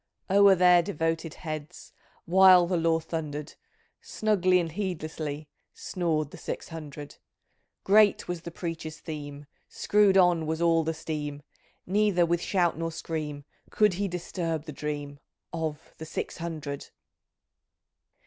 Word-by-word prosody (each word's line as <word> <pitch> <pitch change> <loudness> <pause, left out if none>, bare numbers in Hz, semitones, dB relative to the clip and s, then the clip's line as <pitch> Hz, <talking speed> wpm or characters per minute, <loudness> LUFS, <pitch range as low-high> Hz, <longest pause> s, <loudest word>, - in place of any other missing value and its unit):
O'ER 200 0 +7
their 180 -1 +6
devoted 165 -2 -2
heads. 155 0 -7 0.3
While 185 0 +7
the 180 +1 -1
law 165 -1 +2
thunder'd. 150 -2 -5 0.5
Snugly 185 -4 +2
and 165 -2 -2
heedlessly 155 -5 -4 0.3
Snored 155 -5 -2
the - - -11
Six - - -5
hundred! 150 -3 -9 0.7
Great 205 +1 +4
was 175 -2 -4
the 170 - -7
preacher's 165 -2 -6
theme; 145 -2 -7 0.2
Screw'd 205 -2 +3
on 175 -4 +4
was 160 0 -1
all 165 -1 +3
the 160 +1 -2
steam; 150 -2 -5 0.4
Neither 195 -2 +2
with 170 0 0
shout 175 -4 +1
nor 165 0 -2
scream 150 -3 -5 0.2
Could 210 -3 +3
he 200 +3 -1
disturb 170 -3 -3
the 155 - -6
dream 145 -1 -5 0.3
Of 160 -3 -4
the 160 - -6
Six - - -4
Hundred 155 -4 -5
165 Hz, 130 wpm, -27 LUFS, 155-180 Hz, 0.7 s, O'ER